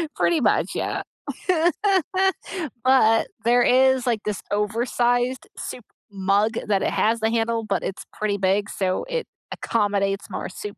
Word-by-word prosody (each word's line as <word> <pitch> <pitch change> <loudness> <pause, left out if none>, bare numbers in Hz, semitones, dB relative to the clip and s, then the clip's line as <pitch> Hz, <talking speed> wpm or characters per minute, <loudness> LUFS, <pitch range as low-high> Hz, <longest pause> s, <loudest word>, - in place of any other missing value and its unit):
Pretty 330 -3 +2
much, - - +2
yeah. - - -2 1.8
But 255 -4 +4 0.2
there 245 +1 +4
is, 260 0 +4
like, 225 -3 +1
this 210 -2 -2
oversized 240 +4 0
soup 245 - -7 0.3
mug 200 +3 +1
that 200 -2 +2
it - - 0
has 225 +2 +1
the 220 0 +1
handle, 230 0 0
but 200 -4 -2
it's 190 - -5
pretty 210 -1 -1
big 200 +2 +1
so 185 -1 -1
it - - -2 0.3
accommodates 200 -2 -1
more - - -5
soup 205 +2 -8
220 Hz, 140 wpm, -23 LUFS, 200-245 Hz, 1.8 s, But